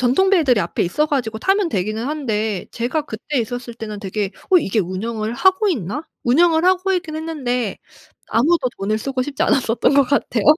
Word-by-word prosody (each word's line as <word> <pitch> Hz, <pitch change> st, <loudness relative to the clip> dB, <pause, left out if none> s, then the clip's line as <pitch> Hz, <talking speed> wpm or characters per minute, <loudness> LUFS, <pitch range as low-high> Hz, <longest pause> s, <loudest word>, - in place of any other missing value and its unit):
전통배들이 270 Hz, -, +3 dB
앞에 170 Hz, -, -1 dB
있어 300 Hz, -, +1 dB
가지고 230 Hz, -7 st, -2 dB
타면 390 Hz, -, +2 dB
되기는 215 Hz, -, -2 dB
하는데 220 Hz, -9 st, -2 dB
제가 250 Hz, +6 st, -2 dB
그때 265 Hz, +2 st, -4 dB
있었을 240 Hz, +1 st, -5 dB
때는 215 Hz, -3 st, -6 dB
되게 200 Hz, 0 st, -2 dB, 0.2 s
'어 370 Hz, -, +7 dB
이게 215 Hz, -, -1 dB
운영을 215 Hz, +5 st, -3 dB
하고 380 Hz, -, +3 dB
있나?' 255 Hz, -, -2 dB, 0.2 s
운영을 320 Hz, +6 st, +4 dB
하고 370 Hz, +1 st, +3 dB
있긴 325 Hz, -4 st, -2 dB
했는데 255 Hz, -9 st, -2 dB, 0.5 s
아무도 275 Hz, +2 st, +2 dB
돈을 215 Hz, +2 st, -1 dB
쓰고 265 Hz, +2 st, -2 dB
싶지 280 Hz, +1 st, -3 dB
않았었던 250 Hz, +1 st, +2 dB
것 280 Hz, -, +6 dB
같아요. 250 Hz, -5 st, 0 dB
250 Hz, 385 characters per minute, -20 LUFS, 220-315 Hz, 0.5 s, 어